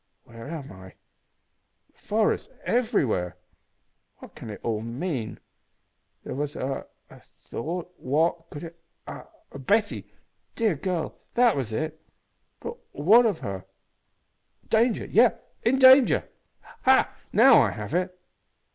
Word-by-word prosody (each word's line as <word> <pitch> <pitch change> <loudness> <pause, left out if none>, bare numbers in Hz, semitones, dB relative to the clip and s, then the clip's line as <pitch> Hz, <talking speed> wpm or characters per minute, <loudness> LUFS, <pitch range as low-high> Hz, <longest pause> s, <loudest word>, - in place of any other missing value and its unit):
Where 115 +2 -11
am 150 -3 -7
I? 95 0 -13 1.0
The - - -31
forest 215 0 0 0.2
everywhere! 175 - 0 0.8
What - - -14
can - - -10
it 105 - -7
all 110 -2 -1
mean? 120 0 -4 0.8
There - - -6
was 145 +2 -3
a 135 +1 -4 0.2
a - - -14
thought 175 +6 -7
what 165 +4 0
could 145 - -8
it 170 0 -10 0.3
Ah! - - -9 0.3
Betty 205 - 0 0.4
dear 225 -5 +1
girl 165 +2 -3 0.2
that 240 -2 +4
was 130 -6 -3
it. 155 +6 -4 0.6
But 470 0 -6 0.2
what 220 +11 +5
of 200 -7 -2
her? 95 -2 -5 1.0
Danger 225 0 +2
yes 235 +2 +4 0.3
in 250 +4 +2
danger. 260 0 +6 0.5
Ha! 265 0 +3 0.2
now 235 - +7
I 115 - +2
have 105 +7 -7
it!" 180 +1 -1
165 Hz, 125 wpm, -26 LUFS, -, 1.0 s, now